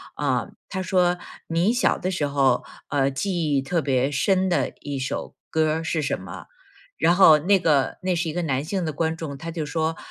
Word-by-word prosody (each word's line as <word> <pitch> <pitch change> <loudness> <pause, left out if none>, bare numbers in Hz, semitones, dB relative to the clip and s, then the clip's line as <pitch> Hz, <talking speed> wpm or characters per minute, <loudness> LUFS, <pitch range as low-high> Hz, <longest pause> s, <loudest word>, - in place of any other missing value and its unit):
啊 - - 0 0.2
她 190 - -3
说： 180 -1 +2 0.3
“你 170 +7 +2
小 245 - +2
的 185 - -2
时 175 -6 -1
候， 135 -3 +2 0.2
呃， 140 -1 +1
记 160 +1 -1
忆 135 - +2
特 165 +5 -1
别 135 -2 +1
深 185 +6 +1
的 180 - +1
一 145 -1 -5
首 130 0 -4
歌 155 -1 +1
儿 160 - -3
是 160 -1 -1
什 140 - 0
么？” - - -9 0.5
然 170 - +4
后 160 -6 +8
那 195 +6 +3
个 150 -6 +2
那 185 -1 +1
是 170 -1 -1
一 - - -2
个 175 +1 -2
男 135 -3 -1
性 180 +3 -2
的 155 - -2
观 160 +2 -1
众， 150 -4 -6
他 165 +4 -6
就 160 -2 -3
说： 160 +1 -1
160 Hz, 225 characters per minute, -24 LUFS, 145-175 Hz, 0.5 s, 后